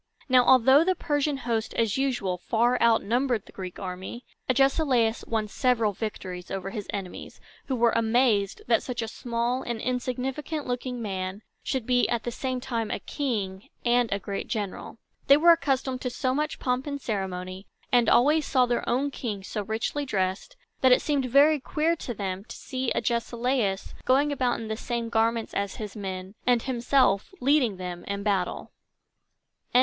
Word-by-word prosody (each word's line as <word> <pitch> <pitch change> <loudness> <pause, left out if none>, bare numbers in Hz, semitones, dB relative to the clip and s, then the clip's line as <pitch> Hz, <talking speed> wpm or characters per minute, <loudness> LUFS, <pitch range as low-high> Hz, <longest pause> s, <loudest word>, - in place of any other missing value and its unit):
Now, 255 -2 +6
although 265 +4 +6
the 370 +2 +2
Persian 290 -2 0
host, 230 -3 -2
as 225 -3 +1
usual, 245 -10 -1
far 235 +6 +1
outnumbered 235 0 +2
the - - -15
Greek 185 -2 -7
army, 190 +5 -6 0.2
Agesilaus 260 -3 +2
won 220 -2 -1
several 230 -2 +1
victories 185 -4 -5
over 195 0 -4
his 210 -2 -5
enemies, 195 -3 -6 0.3
who 265 - 0
were 235 -1 +3
amazed 225 -3 +2
that 235 -1 +3
such 245 -2 -4
a - - -4
small 235 +2 -2
and 235 -2 -4
insignificant 255 +5 -3
looking 245 -1 -3
man 190 0 -4 0.2
should 260 -4 -2
be 245 0 +2
at 235 -1 -1
the 240 - -3
same 255 +1 -3
time 230 -3 -3
a - - -1
king 205 -9 -3 0.2
and 240 -1 +3
a 200 - +1
great 200 0 -5
general. 205 +1 -4 0.3
They 280 - +8
were 340 +3 +7
accustomed 270 -5 +1
to 250 - -2
so 255 +1 -1
much 300 +3 -1
pomp 250 +2 -1
and 280 -1 -3
ceremony, 190 -4 -4 0.2
and 240 -3 +4
always 300 +4 +4
saw 255 -1 +4
their 240 -1 -1
own 270 +4 +1
king 210 -7 -4
so 210 - -4
richly 220 +7 -2
dressed, 195 - -2 0.2
that 260 - +5
it 250 - +5
seemed 285 -3 +1
very 285 +4 +5
queer 315 +5 0
to 240 -6 -5
them 195 -1 -3
to - - -9
see 260 -2 -3
Agesilaus 235 -3 -1
going 280 +3 +3
about 255 -3 0
in 225 - -6
the 220 - -2
same 235 0 -3
garments 225 0 +1
as 200 -1 -2
his 210 -1 -7
men, 190 -2 -5
and 245 -2 +3
himself 245 -5 +2
leading 255 -7 +2
them 180 -1 -6
in 200 0 -3
battle. 195 -4 -1 1.0
LXXIV. - - +8
235 Hz, 175 wpm, -27 LUFS, 205-260 Hz, 1.0 s, They